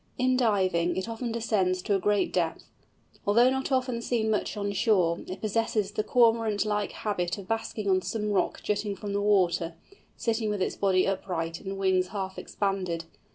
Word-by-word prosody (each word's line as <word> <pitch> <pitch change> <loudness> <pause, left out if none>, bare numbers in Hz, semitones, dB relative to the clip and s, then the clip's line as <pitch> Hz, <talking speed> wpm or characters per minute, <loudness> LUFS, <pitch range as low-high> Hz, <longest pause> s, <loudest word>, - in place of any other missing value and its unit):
In 255 0 +2
diving, 190 -8 +2
it 190 - -2
often 230 +1 -4
descends 195 -5 0
to 205 - 0
a 195 - +3
great 205 +2 +1
depth. - - 0 0.6
Although 235 +5 +5
not 265 +1 -2
often 255 -2 0
seen 225 -2 0
much 210 0 -1
on 200 0 -1
shore, 185 -6 +2
it 185 +1 -6
possesses 215 -2 0
the 215 - -1
Cormorant 225 -4 +3
like 210 -1 -1
habit 180 -4 -2
of 195 -2 -9
basking 225 -2 -3
on 185 -1 +3
some 210 +1 -2
rock 200 - 0
jutting 205 -1 -1
from 200 +1 -5
the 200 - 0
water, 180 -5 +2 0.4
sitting 225 -2 0
with 210 -1 -1
its 185 - -1
body 190 -2 +2
upright 170 -4 -2
and 195 0 -5
wings 190 -1 +2
half 190 -1 -4
expanded. 185 -4 -2
205 Hz, 180 wpm, -28 LUFS, 185-225 Hz, 0.6 s, Although